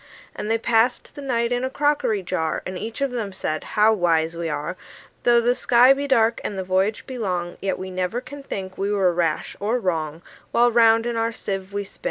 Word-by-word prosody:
And 210 - -4
they 225 - +3
passed 230 +2 +1
the 285 - -9
night 235 -3 0
in 245 +1 0
a 260 - 0
crockery 285 -8 +1
jar; 160 -2 -2
And 185 - -5
each 225 +7 -6
of 275 -2 +1
them 225 -5 -3
said, 155 -5 -3
"How 215 +1 +6
wise 165 -4 +1
we 165 -1 -3
are! 150 +4 -3 0.5
Though 240 -1 +6
the 240 +1 +3
sky 250 +1 +5
be 280 +1 -3
dark, 230 -4 +3
and 200 - -4
the 190 - -2
voyage 190 +3 0
be 255 -2 -7
long, 180 -5 -2
Yet 195 - -1
we 185 0 -6
never 185 +5 -2
can 285 +3 -10
think 190 -8 -6
we 200 +1 0
were 190 -3 +2
rash 165 -3 -1
or 215 +5 0
wrong, 165 -6 -2 0.3
While 240 +1 +4
round 225 -1 +5
in 240 -1 -2
our 225 0 0
sieve 195 -3 -5
we 200 0 -2
spin." 195 - -16
210 Hz, 225 wpm, -23 LUFS, 185-240 Hz, 0.5 s, How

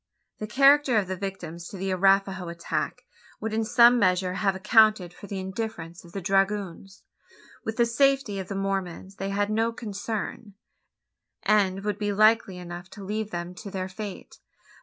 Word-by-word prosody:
The 215 - -4
character 275 +2 +5
of 200 -3 +1
the 185 - -3
victims 175 -3 -6
to 195 - -9
the 190 +1 -2
Arapaho 195 -1 +2
attack 170 0 -3 0.4
would 220 0 -4
in 225 +1 +1
some 240 +2 +6
measure 180 -2 +2
have 195 0 0
accounted 210 -2 +4
for 205 - -12
the 195 - -5
indifference 190 -3 -5
of 170 - -15
the 195 - -5
dragoons. 195 0 -1 0.6
With 220 0 -4
the 235 - +4
safety 265 -3 +2
of 190 - -5
the 200 - -5
Mormons 195 -1 -3
they 195 - -3
had 205 +1 0
no 225 +2 +1
concern; 215 -1 -5 0.9
and 195 -2 +2
would 210 -1 -2
be 205 -1 -1
likely 215 -2 +3
enough 175 +1 -8
to 200 - -11
leave 210 +2 -3
them 175 -1 -5
to 200 +3 -9
their 185 -1 -4
fate. 200 0 -8
195 Hz, 170 wpm, -26 LUFS, 185-215 Hz, 0.9 s, some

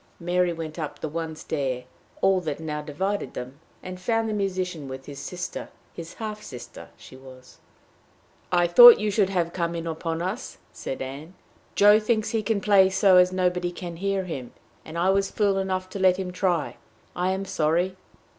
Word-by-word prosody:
Mary 175 0 +1
went 165 -1 -6
up 150 -2 -5
the - - -3
one 160 +1 -4
stair 135 -5 -3 0.4
all 190 -1 +3
that 155 -4 -4
now 150 -2 -4
divided 190 +7 -3
them, 130 +3 -7 0.2
and 185 0 -8
found 225 +3 0
the 215 - -2
musician 185 -6 -2
with 130 0 -8
his 140 -1 -9
sister 180 0 -6 0.2
his 170 -1 -9
half 215 -1 -6
sister 125 -10 -10
she - - -14
was. 130 -1 -15 0.9
"I 175 -1 +3
thought 240 +8 +10
we 210 0 -1
should 200 -2 +2
have 175 -3 -1
you 175 -2 0
in 165 0 -4
upon 165 0 -3
us!" 200 +8 -5 0.2
said 135 - -5
Ann. 145 +7 -8 0.4
"Joe 205 +1 +7
thinks 215 0 0
he 225 - 0
can 215 -1 -1
play 195 -2 +5
so 190 -1 +4
as 180 0 +5
nobody 180 -1 0
can 175 -1 -7
hear 195 +1 -1
him; 135 -9 -7 0.3
and 160 +1 -8
I 180 +3 +3
was 195 0 +1
fool 200 -2 +1
enough 185 -1 -2
to 200 - -5
let 185 -1 +4
him 185 -1 -4
try. 180 -3 -1 0.4
I 180 +1 0
am 190 +1 -2
sorry." 175 +2 0
180 Hz, 185 wpm, -25 LUFS, 160-195 Hz, 0.9 s, thought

